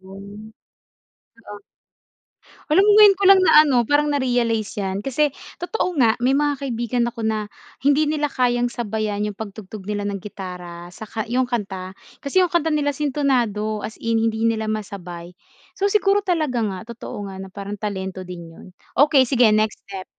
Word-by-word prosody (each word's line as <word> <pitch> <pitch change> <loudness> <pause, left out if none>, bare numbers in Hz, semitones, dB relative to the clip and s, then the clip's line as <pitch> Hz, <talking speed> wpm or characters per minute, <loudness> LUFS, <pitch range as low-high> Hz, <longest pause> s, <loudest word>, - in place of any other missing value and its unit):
yun, 200 +3 -11 1.0
oh. 205 0 -8 1.1
Alam 320 +6 +5
mo 420 - +5
ngayon 410 -2 +8
ko 400 - -1
lang 390 - +8
na 305 -4 +7
ano 250 -5 +2
parang 295 0 +3
na-realize 240 -5 0
yan 195 -1 -2
kasi 275 +5 0 0.2
totoo 360 -1 -2
nga, 230 -5 +4
may 260 +3 +2
mga 290 -1 0
kaibigan 240 0 -1
ako 230 -2 -6
na 215 -1 -1 0.3
hindi 285 +3 +3
nila 300 -1 0
kayang 245 -2 +1
sabayan 215 -3 -3
yung 210 -1 -5
pag-tugtog 210 -2 -8
nila 205 -1 -3
ng 200 -1 -3
gitara 180 -3 -8
saka 220 +2 -6
yung 255 +1 +1
kanta, 195 -5 -4 0.3
kasi 365 +7 +2
yung 350 - -2
kanta 330 -2 +2
nila 290 -1 +1
sintonado 250 -8 0
as 220 - -7
in 230 0 +1
hindi 225 0 0
nila 220 -1 +1
masabay. 180 -5 -6 0.5
So 400 +1 +2
siguro 405 0 +3
talaga 315 - 0
nga 200 -4 -2
totoo 205 -3 -7
nga 190 - -9
na 190 - -8
parang 200 +1 -7
talento 190 -3 -4
din 170 -2 -9
yun, - - -14 0.3
okey 285 -2 +6
sige 245 -3 +4
next 215 0 0
step. 190 -1 -7
225 Hz, 170 wpm, -22 LUFS, 200-280 Hz, 1.1 s, ngayon